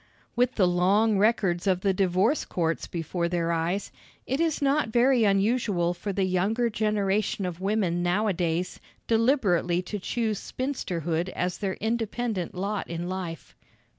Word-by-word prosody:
With 245 0 +2
the 190 - +4
long 195 +4 +3
records 200 -4 +2
of 185 -1 +2
the 195 -1 +2
divorce 190 - +2
courts 165 -2 -2
before 170 +1 -2
their 170 -1 0
eyes, 170 +4 -1 0.3
it 265 +3 -1
is 325 -2 +1
not 280 -3 +1
very 240 0 +4
unusual 195 -3 +2
for 200 +3 -4
the 195 0 0
younger 200 +6 +1
generation 210 -2 0
of 180 0 -5
women 195 -4 0
nowadays 180 -2 0 0.3
deliberately 215 - +2
to 205 +3 -5
choose 220 +1 -1
spinsterhood 175 - -3
as 180 -1 -3
their 195 -2 -2
independent 225 -4 -2
lot 200 +2 -2
in 170 +1 -4
life. 180 -3 -6
195 Hz, 140 wpm, -26 LUFS, 175-220 Hz, 0.3 s, the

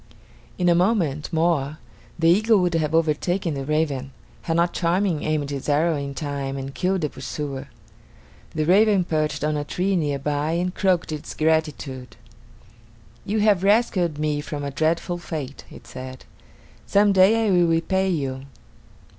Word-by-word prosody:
In 180 - +1
a 175 - +6
moment 170 -6 +1
more 160 -3 +1 0.4
the 165 - +2
eagle 215 +6 +5
would 175 -1 +1
have 160 -1 0
overtaken 165 +2 0
the 135 -1 -4
raven, 145 -3 -1 0.3
had 165 0 -1
not 170 +1 +2
Charming 175 -1 0
aimed 150 -2 -1
his 140 +1 -4
arrow 155 +3 +2
in 140 -1 -4
time 140 -2 -4
and 135 0 -6
killed 185 +3 0
the 150 - -1
pursuer. 135 0 -6 0.9
The 155 - +1
raven 200 +2 +4
perched 155 -3 -1
on 150 0 0
a 145 - -1
tree 185 +6 -1
near 145 -5 0
by 145 +3 -1
and 180 +1 -1
croaked 185 -5 +1
its 150 -1 -6
gratitude: 150 -6 -1 1.1
"You 210 +1 0
have 205 -4 +4
rescued 195 -6 +2
me 150 -1 -1
from 145 -1 -5
a 140 - -3
dreadful 165 +4 -1
fate," 150 -5 -6
it - - -13
said. 130 0 -9 0.6
"Some 205 0 +4
day 200 +4 +5
I - - +2
will 175 -2 +4
repay 190 +4 +1
you." 135 -5 -3
160 Hz, 160 wpm, -23 LUFS, 145-180 Hz, 1.1 s, a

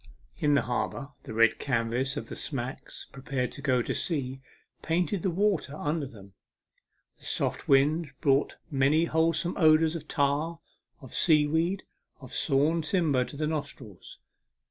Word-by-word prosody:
In 145 -1 +3
the - - +3
harbour 125 +3 -2 0.2
the - - -7
red 115 0 +4
canvas 130 +2 0
of - - -5
smacks 130 -2 -4
preparing 135 -2 -3
to - - -5
go 130 -4 +2
to - - -2
sea 135 -5 -1 0.4
painted 175 +3 0
the 190 - +1
water 180 -5 0
under 150 -1 -2
them. 100 -5 -14 0.9
The - - -14
soft - - -1
wind 145 +4 +4
brought 140 -2 +2 0.2
many 145 +4 +3
wholesome 165 +1 +1
odours 160 -1 +5
of 155 -2 -6
tar, 150 +3 0 0.4
of 130 - -12
sea 150 -3 +4
weed, 165 +6 0 0.4
of 130 -3 -11
sawn 155 +3 +2
timber 155 -6 +2
to 140 - -9
the 155 - 0
nostrils. 145 - -5
145 Hz, 145 wpm, -28 LUFS, 135-165 Hz, 0.9 s, odours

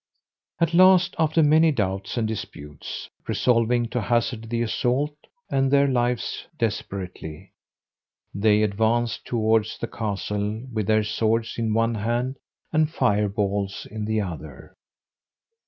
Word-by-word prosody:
At 170 -1 +1
last, 185 0 +6
after 160 0 +3
many 155 +2 +5
doubts 95 -4 -2
and 115 -2 +1
disputes, 75 -9 -7 0.2
resolving 120 0 +2
to 125 0 -1
hazard 115 0 -1
the 120 0 0
assault 125 +6 0 0.4
and 135 -1 +2
their 140 0 +4
lives 125 -2 -1
desperately, 95 -8 -4 0.8
they 105 +1 +3
advanced 110 +3 0
towards 110 -2 +1
the - - -3
castle 105 0 -3
with 110 -3 -1
their 110 0 +3
swords 110 +2 0
in 110 -2 0
one 115 +1 +2
hand, 120 +5 -1 0.4
and 155 -1 +3
fire 105 -9 +1
balls 100 0 -2
in 105 0 -4
the 110 0 0
other. 90 -5 -8
115 Hz, 125 wpm, -24 LUFS, 105-125 Hz, 0.8 s, last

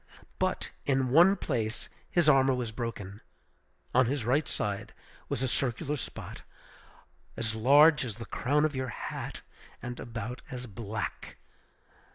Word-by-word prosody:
But - - 0
in 130 -2 +1
one 175 +7 +7
place 110 - -2 0.2
his 170 -3 +3
armor 135 -2 +5
was 120 -3 -3
broken. 105 -4 -5 0.7
On 130 -1 +5
his 135 -3 -1
right 140 +6 +2
side 105 +1 -3 0.3
was 130 - -1
a - - +2
circular 135 +4 -1
spot, 130 - -7 1.0
as 110 -1 -1
large 145 +8 +6
as 115 -5 -4
the 115 0 -8
crown 145 +7 +1
of 155 -2 -1
your 130 0 -1
hat, - - -5 0.4
and 120 0 -6
about 115 +1 -5
as 125 -2 -5
black! 105 -1 -5
125 Hz, 140 wpm, -30 LUFS, 115-140 Hz, 1.0 s, one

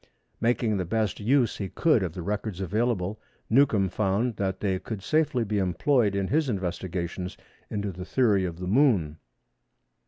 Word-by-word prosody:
Making 115 -2 +1
the 95 - -1
best 110 +2 -1
use 120 +2 +2
he 100 -2 -4
could 155 -9 +2
of 90 -4 -2
the 90 - -6
records 105 0 -3
available 105 0 -1 0.3
Newcomb 110 -6 +4
found 105 +5 0
that 95 -1 -2
they 95 -3 0
could 105 -2 -6
safely 155 -5 +1
be 105 -1 -1
employed 100 - +2
in 95 -1 -1
his 150 -1 +1
investigations 90 -2 -3 0.3
into 100 -1 -2
the 90 +1 -7
theory 105 -2 +2
of 85 -2 -3
the 90 - -5
Moon. 95 - +2
100 Hz, 160 wpm, -27 LUFS, 95-115 Hz, 0.3 s, Newcomb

